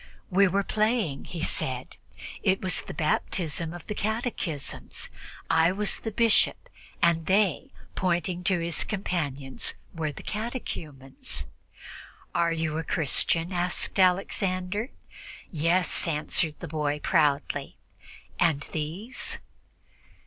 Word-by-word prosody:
"We 195 +2 +6
were 200 +2 +2
playing," 215 - +1
he 170 -3 -5
said. 130 -5 -2 0.5
"It 190 0 +3
was 185 -1 0
the - - -8
baptism 165 +1 0
of 175 0 -8
the - - -3
catechumens. 210 - -3 0.4
I 165 +2 +5
was 205 +2 +1
the 225 - -3
bishop, 225 0 +3 0.3
and 165 -1 +3
they" 205 +7 +2 0.2
pointing 180 0 0
to 190 -1 +4
his 170 0 +1
companions 145 -9 -2 0.2
were 155 -2 -1
the - - -10
catechumens." 150 - -5 0.9
"Are 170 -1 +3
you 160 -1 -1
a - - -2
Christian?" 165 +3 +2
asked 180 +2 0
Alexander. 185 +3 +2 0.6
"Yes," 170 +3 +3
answered 155 0 +1
the 175 - -4
boy 150 -1 -1
proudly. 145 -1 +1 0.6
"And 160 -5 +3
these?" 170 +11 -3
175 Hz, 110 wpm, -28 LUFS, 155-195 Hz, 0.9 s, We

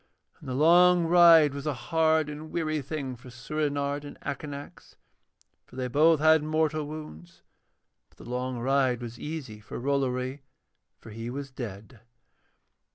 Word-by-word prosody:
And - - -10
the 125 - -3
long 175 +4 +5
ride 165 -4 +6
was 140 +1 -6
a 150 - -1
hard 160 +1 +1
and 150 +1 -8
weary 155 -2 -2
thing 135 -2 -5
for 125 +2 -14
Soorenard 145 +2 -3
and 145 - -10
Akanax, 140 0 -8 0.7
for - - -16
they 130 -1 -3
both 155 +5 +4
had 155 0 +5
mortal 155 0 -1
wounds; 90 - -10 0.7
but - - -30
the - - -13
long 125 +1 -3
ride 130 0 +1
was 120 -1 -8
easy 145 -9 -6
for 105 - -8
Rollory, 130 0 -1 0.6
for 110 - -13
he 115 +2 -6
was 135 +1 -6
dead. 115 -1 -8
140 Hz, 150 wpm, -27 LUFS, 125-155 Hz, 0.7 s, ride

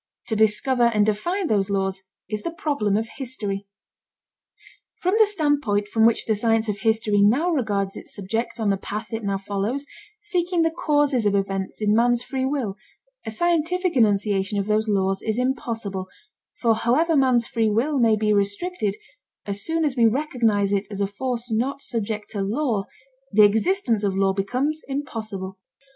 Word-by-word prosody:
To 220 - 0
discover 220 +4 +2
and 210 -2 +3
define 345 - -1
those 205 -8 +1
laws 195 -1 -1 0.3
is 210 +1 -3
the - - -3
problem 285 -11 0
of 225 +1 -2
history. 210 -7 -4 1.3
From 365 +1 -1
the 440 - +7
standpoint 290 - 0
from 225 +1 +4
which 230 - +1
the 220 - +1
science 225 +1 +1
of 205 -1 -2
history 220 -2 +2
now 260 - +3
regards 205 - -1
its - - -6
subject 225 +5 -3
on 215 -2 +2
the 195 - 0
path 210 +4 -6
it 225 0 -3
now 200 -1 0
follows, 205 +8 -3 0.3
seeking 360 -4 0
the 325 - +2
causes 290 -8 +1
of 200 - +2
events 195 +1 -2
in 210 0 +3
man's 240 +2 +3
free 260 0 -2
will, 255 -8 -2 0.5
a - - 0
scientific 345 - 0
enunciation 205 -3 +2
of 200 - 0
those 215 +1 +1
laws 195 -1 +1
is 220 0 -2
impossible, 225 -7 -2 0.5
for 230 -2 +3
however 260 +9 +2
man's 255 -4 +3
free 225 -2 0
will 265 +7 +1
may 225 -2 +4
be 210 0 +1
restricted, 205 - -1 0.5
as 200 0 -3
soon 325 0 0
as 285 -4 0
we 235 -3 +5
recognize 225 -6 +1
it 200 0 0
as 200 -1 -5
a - - +3
force 240 +4 -4
not 255 +6 0
subject 215 -4 -3
to 205 - -3
law, 215 0 -1 0.5
the 210 +1 +6
existence 225 - +1
of 195 -2 0
law 195 0 +2
becomes 255 +11 -1
impossible. 220 -9 -5
220 Hz, 170 wpm, -23 LUFS, 205-270 Hz, 1.3 s, the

